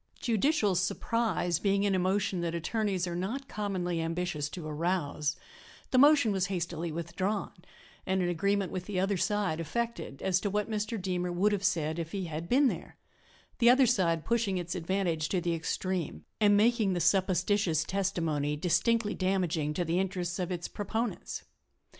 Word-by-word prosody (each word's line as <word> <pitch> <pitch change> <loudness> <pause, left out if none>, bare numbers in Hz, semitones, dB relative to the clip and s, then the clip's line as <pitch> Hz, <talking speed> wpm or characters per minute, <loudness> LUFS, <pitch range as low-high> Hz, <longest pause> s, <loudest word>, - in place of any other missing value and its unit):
Judicial 230 -2 +2
surprise 185 -1 0
being 200 0 +2
an 200 - +2
emotion 190 0 +1
that 170 -1 -2
attorneys 190 +1 -1
are 175 -1 -4
not 230 +10 -3
commonly 185 -6 -2
ambitious 165 -3 -2
to 175 -1 -7
arouse, 155 -2 -1 0.6
the 255 - +3
motion 285 -5 +6
was 190 -2 0
hastily 170 -3 -3
withdrawn 185 +5 -2 0.5
and 190 0 0
an - - +1
agreement 200 +3 0
with 185 -1 -4
the 200 -3 -1
other 195 +2 +1
side 195 -3 0
effected 230 - -3
as 185 -1 +2
to 205 - -1
what 210 +1 -1
Mr. 215 +1 -2
Deemer 180 -1 -2
would 190 +4 +2
have 200 -2 -1
said 160 -4 0
if 165 -1 -5
he 195 -2 -2
had 165 +1 -5
been 275 +3 +5
there - - -4 0.6
the 235 -1 +6
other 260 +2 +6
side 175 -9 +1
pushing 225 -5 +1
its 175 0 -3
advantage 175 -3 -1
to 185 - +1
the 175 -1 -1
extreme 165 - -3
and 205 -1 +5
making 220 -2 +3
the 175 - -1
supposititious 185 -1 +2
testimony 165 -6 -1
distinctly 210 +7 +1
damaging 180 -5 0
to 175 +3 -1
the 170 +2 +1
interests 180 -2 -2
of 180 0 -2
its 175 -1 -3
proponents. 220 +3 -3
185 Hz, 165 wpm, -30 LUFS, 170-205 Hz, 0.6 s, motion